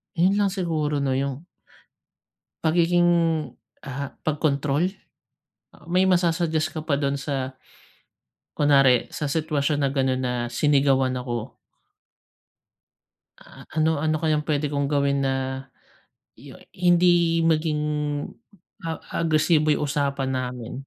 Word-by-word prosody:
Yun 185 +4 +3
lang 205 - +3
siguro 160 -7 -1
'no, 135 - 0
yung 140 +2 -3 1.2
pagiging, 175 +2 +3 0.8
ah, 140 0 -6
pagkontrol? 150 +1 0 0.9
Ah, - - -20
may 185 +1 +3
masa-suggest 170 -3 +1
ka 155 0 -7
pa 145 - +2
dun 140 0 -1
sa 135 -2 -3 1.1
kunwari, 135 -4 +4
sa 150 - -4
sitwasyon 145 -1 0
na 140 - +2
ganun 130 -1 0
na 125 -1 -1
sinigawan 135 0 +2
ako. 120 -1 -5 1.8
Ah, - - -15
ano 160 0 +2
ano 155 +1 0
kayang 155 -2 +1
pwede 150 -1 0
kong 140 -1 -1
gawin 140 -1 +1
na 135 0 -2 0.7
yu - - -13 0.2
hindi 175 -1 +3
maging 155 -2 +1 1.0
a 165 -2 -4 0.2
agresibo 155 -1 +2
yung 150 0 +2
usapan 140 -2 -1
namin? 125 -2 -4
150 Hz, 110 wpm, -24 LUFS, 135-160 Hz, 1.8 s, kunwari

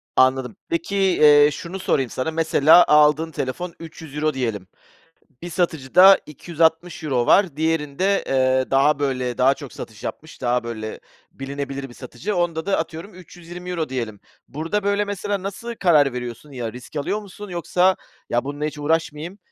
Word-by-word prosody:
Anladım. 130 -2 +2
Peki, 170 +4 -2
eee, 150 -6 +5
şunu 175 +6 -7
sorayım 135 -8 0
sana; 145 +5 -3
mesela, 160 +1 +5
aldığın 150 +2 +4
telefon 165 +6 -4
€300 155 -2 -4
diyelim. 110 -8 -3 0.8
Bir 175 - -6
satıcıda 175 +3 +5
€260 160 -4 -1
var, 185 -8 +4
diğerinde, 160 +4 0
eee, 130 -1 +1
daha 140 +2 +3
böyle, 130 -3 -2
daha 135 +2 +4
çok 140 -3 -10
satış 110 -3 -10
yapmış, 155 - -7
daha 125 -1 0
böyle 110 -2 -6 0.3
bilinebilir 140 0 -6
bir 120 - -14
satıcı. 140 - -5
Onda 170 -1 -1
da 200 - +1
atıyorum 165 +4 -6
€320 175 -2 -7
diyelim. 115 -6 -4 0.3
Burada 165 +8 -3
böyle 200 +1 +1
mesela 200 -1 -3
nasıl 230 +4 -6
karar 150 -7 +4
veriyorsun? 125 +3 -7
Ya, 120 -3 -5
risk 125 +4 -12
alıyor 200 +9 -1
musun, 205 0 -10
yoksa 180 +2 +1 0.3
“ya, 120 +2 +1
bununla 145 +1 -4
hiç 150 0 -4
uğraşmayayım, 160 +4 -2
150 Hz, 150 wpm, -22 LUFS, 130-175 Hz, 0.8 s, eee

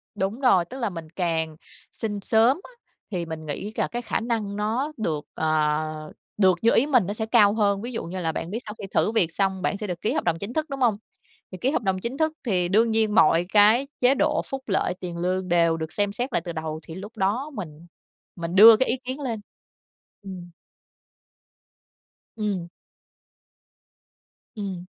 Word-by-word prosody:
Đúng 205 +4 -2
rồi. 190 -10 +4
Tức 255 +10 -9
là 230 -5 -1
mình 165 -3 -8
càng 160 -2 -1 0.4
xin 210 -2 -4
sớm 225 - +3
á, - - -13 0.4
thì 175 -3 -2
mình 160 -1 -7
nghĩ 200 +8 -5
là - - 0
cái 240 - -4
khả 235 - -2
năng 225 -3 -2
nó 225 +8 -1
được, 160 -9 -2
ờ, 155 0 0 0.8
được 190 -3 +4
như 230 - +4
ý 265 - +4
mình 250 -9 +4
nó 205 - -2
sẽ 220 0 -3
cao 215 -3 +5
hơn. 200 -2 +1
Ví 240 +2 -5
dụ 230 - -4
như 180 +3 -5
là 165 -2 -1
bạn 165 - -5
biết 225 - -2
sau 210 - -6
khi - - -5
thử - - +2
việc 180 -8 +2
xong, 190 -1 0
bạn 200 - 0
sẽ 210 - -5
được 180 -2 -5
ký 215 - 0
hợp - - -1
đồng 170 -2 +1
chính 200 +6 -5
thức, 310 -1 -2
đúng 275 -1 -5
hông? 235 -5 +3 0.5
Thì 185 - -7
ký 265 - +2
hợp 270 - 0
đồng 190 -2 0
chính 240 +7 -4
thức 315 0 +1
thì 180 -5 +1
đương 225 +5 +3
nhiên 220 -1 +1
mọi 170 -3 +5
cái 215 +6 +6
chế 255 +2 +4
độ, 300 +2 +1
phúc 270 -1 -5
lợi, 195 -2 +1
tiền 175 -2 -6
lương 185 +1 -1
đều 170 -1 +3
được 160 -1 -5
xem 205 -1 0
xét 245 +3 -3
lại - - +2
từ 170 - -4
đầu, 155 -1 -4
thì 160 - -9
lúc 205 +4 -9
đó 215 +10 0
mình 170 - -8 0.5
mình 170 0 -4
đưa 220 +3 +10
cái 260 - +1
ý - - +1
kiến 260 +3 -4
lên. 230 -6 -3 0.8
Ừm. 185 -3 -8 1.9
Ừm. 200 -5 -2 1.9
Ừm. 195 -4 -5
205 Hz, 205 wpm, -25 LUFS, 175-230 Hz, 1.9 s, đưa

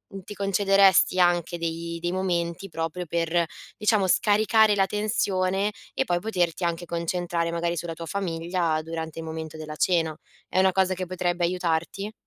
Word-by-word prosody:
n 195 - -7
ti 205 - -9
concederesti 195 -2 +4
anche 175 -1 +2
dei 170 0 -4
dei 175 0 -1
momenti 180 0 -2
proprio 165 +2 -4
per, 170 +1 +1 0.3
diciamo, 210 -2 +2
scaricare 215 +2 +4
la 195 -1 +3
tensione 200 -1 0 0.2
e - - +1
poi 175 -5 +1
poterti 180 -4 -1
anche 170 0 -2
concentrare, 170 0 -2
magari, 170 0 -1
sulla 165 +1 -4
tua 165 +1 -7
famiglia, 170 -3 -1
durante 160 0 -5
il 165 - -6
momento 160 0 -6
della 155 -1 -7
cena. 165 -3 +1 0.3
È - - +1
una 190 0 +5
cosa 190 0 +2
che 185 0 -3
potrebbe 175 -1 0
aiutarti? 180 +3 -2
175 Hz, 160 wpm, -25 LUFS, 165-190 Hz, 0.3 s, una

